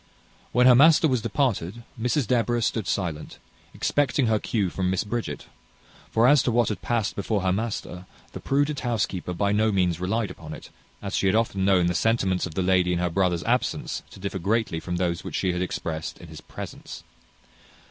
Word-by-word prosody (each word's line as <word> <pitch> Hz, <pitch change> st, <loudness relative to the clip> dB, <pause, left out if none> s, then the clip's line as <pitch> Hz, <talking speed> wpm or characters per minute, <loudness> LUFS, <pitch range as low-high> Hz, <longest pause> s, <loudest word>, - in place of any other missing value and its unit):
When 125 Hz, +1 st, +4 dB
her 125 Hz, -, +8 dB
master 155 Hz, +5 st, +6 dB
was 130 Hz, -5 st, +1 dB
departed, 115 Hz, -, -1 dB, 0.2 s
Mrs 125 Hz, +3 st, +1 dB
Deborah 120 Hz, 0 st, +1 dB
stood 110 Hz, -3 st, -1 dB
silent, 85 Hz, -6 st, -3 dB, 0.3 s
expecting 145 Hz, -2 st, +1 dB
her 110 Hz, -2 st, +2 dB
cue 100 Hz, -6 st, -1 dB
from 95 Hz, -1 st, -1 dB
Miss 95 Hz, -1 st, 0 dB
Bridget; 115 Hz, +2 st, -4 dB, 0.6 s
for 115 Hz, +2 st, +3 dB
as 145 Hz, 0 st, +6 dB
to 125 Hz, -, 0 dB
what 120 Hz, -1 st, +2 dB
had 105 Hz, -5 st, -4 dB
past 115 Hz, -4 st, -1 dB
before 100 Hz, 0 st, -1 dB
her 95 Hz, 0 st, +1 dB
master, 95 Hz, -4 st, -4 dB, 0.2 s
the -, -, -7 dB
prudent 145 Hz, +1 st, 0 dB
housekeeper 110 Hz, -7 st, -2 dB
by 100 Hz, +3 st, 0 dB
no 110 Hz, +1 st, +2 dB
means 90 Hz, -4 st, +1 dB
relied 105 Hz, +4 st, -1 dB
upon 80 Hz, -2 st, -9 dB
it, -, -, -13 dB, 0.3 s
as 100 Hz, 0 st, -3 dB
she 95 Hz, -, +1 dB
had 95 Hz, -, +3 dB
often 105 Hz, -4 st, +1 dB
known 95 Hz, -3 st, +4 dB
the 90 Hz, -, +1 dB
sentiments 95 Hz, -3 st, +1 dB
of 80 Hz, -, -11 dB
the 95 Hz, -, 0 dB
lady 90 Hz, -1 st, +2 dB
in -, -, 0 dB
her 90 Hz, 0 st, -1 dB
brother's 90 Hz, -1 st, +1 dB
absence -, -, -1 dB
to -, -, -13 dB
differ 100 Hz, 0 st, -4 dB
greatly 105 Hz, -2 st, 0 dB
from 90 Hz, +2 st, -4 dB
those 85 Hz, -1 st, -1 dB
which -, -, -6 dB
she 90 Hz, -2 st, 0 dB
had 90 Hz, -, -2 dB
expressed 80 Hz, -3 st, -4 dB
in 85 Hz, -, -13 dB
his 80 Hz, -, -10 dB
presence. -, -, -9 dB
100 Hz, 200 wpm, -25 LUFS, 90-115 Hz, 0.6 s, her